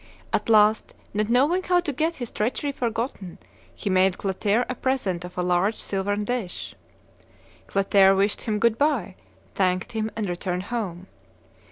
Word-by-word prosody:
At -, -, 0 dB
last, 215 Hz, 0 st, +4 dB, 0.2 s
not 210 Hz, +1 st, 0 dB
knowing 285 Hz, +10 st, +3 dB
how 360 Hz, -1 st, +2 dB
to 315 Hz, -5 st, -3 dB
get 320 Hz, +5 st, 0 dB
his 245 Hz, -3 st, -6 dB
treachery 250 Hz, +6 st, -1 dB
forgotten, 230 Hz, -7 st, -3 dB, 0.4 s
he -, -, -7 dB
made 185 Hz, -1 st, +3 dB
Clotaire 205 Hz, +4 st, 0 dB
a -, -, -2 dB
present 240 Hz, -10 st, -1 dB
of 180 Hz, 0 st, -10 dB
a 180 Hz, -, 0 dB
large 180 Hz, +4 st, +2 dB
silvern 205 Hz, +1 st, -2 dB
dish. 230 Hz, -6 st, -4 dB, 0.9 s
Clotaire 195 Hz, 0 st, +4 dB
wished 200 Hz, +2 st, +1 dB
him 215 Hz, -3 st, -1 dB
good 230 Hz, +1 st, +2 dB
by, 285 Hz, -, +1 dB, 0.4 s
thanked 185 Hz, +1 st, 0 dB
him, 220 Hz, -1 st, -2 dB
and 215 Hz, -2 st, -2 dB
returned 180 Hz, 0 st, -3 dB
home. 185 Hz, -6 st, -3 dB
210 Hz, 155 wpm, -25 LUFS, 190-245 Hz, 0.9 s, last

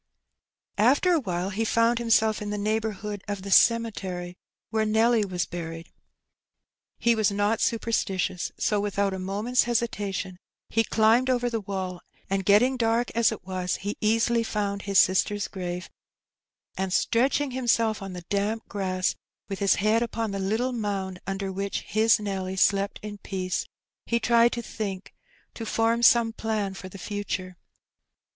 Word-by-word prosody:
After 275 Hz, -, +4 dB
a 330 Hz, -, +3 dB
while 185 Hz, -5 st, -3 dB
he 215 Hz, +3 st, -1 dB
found 230 Hz, +1 st, +2 dB
himself 220 Hz, -2 st, +2 dB
in 210 Hz, -, -4 dB
the 210 Hz, -, -2 dB
neighbourhood 210 Hz, -1 st, -2 dB
of 200 Hz, -2 st, -4 dB
the 200 Hz, -, -6 dB
cemetery 190 Hz, -6 st, +2 dB, 0.4 s
where 220 Hz, -1 st, +1 dB
Nelly 220 Hz, +1 st, +3 dB
was 180 Hz, -3 st, -2 dB
buried. 165 Hz, -1 st, -7 dB, 1.1 s
He 235 Hz, -, +3 dB
was 215 Hz, -3 st, +2 dB
not 205 Hz, +2 st, +1 dB
super 230 Hz, 0 st, 0 dB
stitious, 185 Hz, -4 st, -1 dB
so 210 Hz, -, +1 dB
without 200 Hz, -1 st, 0 dB
a 190 Hz, -, -4 dB
moment's 205 Hz, +7 st, 0 dB
hesitation 205 Hz, -6 st, -2 dB, 0.3 s
he 225 Hz, -, +2 dB
climbed 225 Hz, +4 st, +3 dB
over 245 Hz, -1 st, +1 dB
the 225 Hz, -1 st, -1 dB
wall, 190 Hz, -2 st, -4 dB, 0.3 s
and, 195 Hz, 0 st, +1 dB
getting 235 Hz, +7 st, +4 dB
dark 230 Hz, 0 st, +1 dB
as 230 Hz, 0 st, +3 dB
it 220 Hz, -, -7 dB
was, 185 Hz, -1 st, -2 dB
he 205 Hz, +1 st, -4 dB
easily 230 Hz, +2 st, +2 dB
found 205 Hz, -3 st, -2 dB
his 200 Hz, 0 st, 0 dB
sister's 200 Hz, +3 st, +3 dB
grave; 180 Hz, -2 st, -5 dB, 0.9 s
and, 190 Hz, -1 st, -2 dB
stretching 265 Hz, +8 st, +1 dB
himself 230 Hz, -4 st, +1 dB
on 195 Hz, -1 st, -6 dB
the 180 Hz, -1 st, -7 dB
damp 205 Hz, +3 st, -1 dB
grass, 185 Hz, -2 st, -1 dB, 0.4 s
with 195 Hz, -, -4 dB
his 200 Hz, -1 st, +3 dB
head 215 Hz, +3 st, +2 dB
upon 230 Hz, -2 st, -2 dB
the 195 Hz, -, -3 dB
little 220 Hz, +7 st, 0 dB
mound 195 Hz, -5 st, -3 dB
under 195 Hz, 0 st, -3 dB
which 195 Hz, +1 st, -3 dB
his 220 Hz, +1 st, +3 dB
Nelly 190 Hz, -2 st, -3 dB
slept 200 Hz, +1 st, +2 dB
in 205 Hz, -1 st, -7 dB
peace, 185 Hz, -2 st, -3 dB, 0.4 s
he 235 Hz, -, +1 dB
tried 235 Hz, 0 st, +4 dB
to 235 Hz, -, -4 dB
think 200 Hz, -4 st, -5 dB, 0.2 s
— -, -, -36 dB
to 230 Hz, -, -7 dB
form 225 Hz, +1 st, +1 dB
some 235 Hz, -1 st, +5 dB
plan 215 Hz, -3 st, -2 dB
for 190 Hz, -1 st, -9 dB
the 195 Hz, -, -10 dB
future. 190 Hz, -2 st, -4 dB
205 Hz, 160 wpm, -26 LUFS, 190-230 Hz, 1.1 s, some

